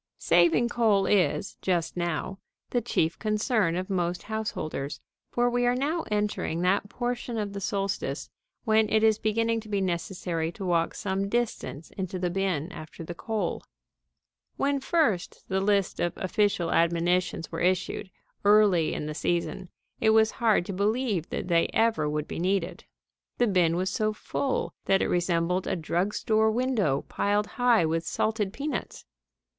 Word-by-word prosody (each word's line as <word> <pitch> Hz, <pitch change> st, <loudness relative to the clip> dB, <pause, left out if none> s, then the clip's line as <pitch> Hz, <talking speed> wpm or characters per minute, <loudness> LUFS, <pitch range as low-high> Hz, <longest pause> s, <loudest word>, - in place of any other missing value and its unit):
Saving 175 Hz, +6 st, +4 dB
coal 220 Hz, -5 st, +2 dB
is, 195 Hz, 0 st, +1 dB
just 175 Hz, -3 st, 0 dB
now, 175 Hz, +2 st, -2 dB, 0.3 s
the 245 Hz, -, +1 dB
chief 165 Hz, -8 st, 0 dB
concern 215 Hz, -4 st, +1 dB
of 185 Hz, +1 st, -2 dB
most 175 Hz, -2 st, -1 dB
householders, 210 Hz, -10 st, -4 dB, 0.3 s
for 245 Hz, 0 st, +1 dB
we 245 Hz, 0 st, +1 dB
are 245 Hz, -, +3 dB
now 305 Hz, +6 st, -1 dB
entering 210 Hz, -5 st, -1 dB
that 195 Hz, +3 st, +1 dB
portion 240 Hz, 0 st, -3 dB
of 205 Hz, -2 st, -3 dB
the 200 Hz, -, -5 dB
solstice 195 Hz, +1 st, -2 dB, 0.4 s
when 220 Hz, -2 st, +3 dB
it 220 Hz, 0 st, +3 dB
is 220 Hz, -1 st, +4 dB
beginning 230 Hz, +1 st, +1 dB
to 220 Hz, -1 st, -11 dB
be 200 Hz, -1 st, 0 dB
necessary 175 Hz, -2 st, -2 dB
to 195 Hz, -, -6 dB
walk 170 Hz, -2 st, +1 dB
some 195 Hz, -1 st, -2 dB
distance 220 Hz, -9 st, -2 dB
into 185 Hz, 0 st, -3 dB
the 180 Hz, -1 st, -1 dB
bin 185 Hz, -3 st, -1 dB
after 155 Hz, +1 st, -9 dB
the 175 Hz, -, -6 dB
coal. 220 Hz, +4 st, -3 dB, 1.0 s
When 280 Hz, 0 st, +1 dB
first 270 Hz, -, 0 dB
the 190 Hz, 0 st, +1 dB
list 200 Hz, -1 st, +1 dB
of 175 Hz, -, 0 dB
official 190 Hz, -3 st, +1 dB
admonitions 170 Hz, +1 st, +1 dB
were 165 Hz, -, -4 dB
issued, 185 Hz, +1 st, 0 dB, 0.3 s
early 200 Hz, -5 st, +4 dB
in -, -, -3 dB
the 150 Hz, -, -4 dB
season, 175 Hz, +3 st, -2 dB, 0.3 s
it 220 Hz, -, +3 dB
was 220 Hz, 0 st, +5 dB
hard 220 Hz, -6 st, +3 dB
to 195 Hz, -, -4 dB
believe 205 Hz, -2 st, 0 dB
that -, -, -4 dB
they 170 Hz, -2 st, +3 dB
ever 220 Hz, -10 st, +2 dB
would 150 Hz, 0 st, -2 dB
be -, -, -5 dB
needed. 185 Hz, 0 st, -1 dB, 0.5 s
The 245 Hz, -, +3 dB
bin 180 Hz, -6 st, +3 dB
was 185 Hz, +2 st, -1 dB
so 215 Hz, 0 st, 0 dB
full 265 Hz, +5 st, -2 dB
that 195 Hz, 0 st, +3 dB
it -, -, -1 dB
resembled 175 Hz, +1 st, +1 dB
a -, -, 0 dB
drug 175 Hz, +4 st, -1 dB
store 220 Hz, 0 st, +2 dB
window 220 Hz, -, +1 dB
piled 205 Hz, +1 st, +1 dB
high 240 Hz, -6 st, +3 dB
with 165 Hz, +1 st, 0 dB
salted 210 Hz, +3 st, -1 dB
peanuts. 285 Hz, +7 st, -4 dB
195 Hz, 160 wpm, -27 LUFS, 175-220 Hz, 1.0 s, was